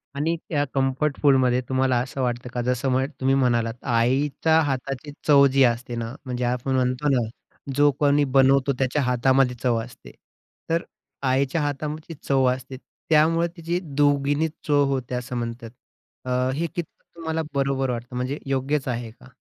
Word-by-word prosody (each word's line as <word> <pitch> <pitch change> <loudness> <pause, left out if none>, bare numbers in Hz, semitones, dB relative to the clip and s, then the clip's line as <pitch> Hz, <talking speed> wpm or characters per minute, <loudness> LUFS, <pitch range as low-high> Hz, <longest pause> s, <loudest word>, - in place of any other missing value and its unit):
आणि 155 +4 0
त्या 145 -3 +1
कम्फर्ट 135 +2 0
फूडमध्ये 130 -3 +4
तुम्हाला 130 -1 +2
असं 130 +2 -5
वाटतं 125 0 -2
का 125 - -1
जसं 125 +2 0
म्ह 130 +1 +2
तुम्ही 135 +1 +2
म्हणालात, 120 -4 +1
आईच्या 135 +6 +2
हाताची 135 0 -3 0.2
चव 140 -2 +7
जी 135 0 +5
असते 120 0 0
ना, 115 0 -4
म्हणजे 125 -1 -3
आपण 125 +2 -1
म्हणतो 130 +3 +1
ना, 125 -5 +2 0.5
जो 145 +1 +5
कोणी 145 0 +3
बनवतो 135 +1 +4
त्याच्या 135 +2 +1
हातामध्ये 125 +1 +2
चव 120 -2 +2
असते. 125 +1 -13 0.6
तर 165 +1 +1 0.4
आईच्या 135 +4 +1
हातामध्ये 150 +3 -4
चव 135 -1 +3
असते, 130 +1 -8 0.3
त्यामुळं 165 +2 +4
तिची 170 +1 -2
दूगिणी 145 0 +1 0.2
चव 145 -1 +4
होते, 130 -2 -2
असं 125 0 -4
म्हणतात. 115 0 -5 0.6
अ, - - -5 0.2
हे 160 +5 -1
कितपत 170 -3 -5 0.2
तुम्हाला 160 -1 -3
बरोबर 135 -1 0
वाटतं? 120 +1 -6
म्हणजे 130 +4 -2
योग्यच 135 +1 -1
आहे 120 -2 -3
का? 125 - -18
135 Hz, 155 wpm, -24 LUFS, 125-145 Hz, 0.6 s, चव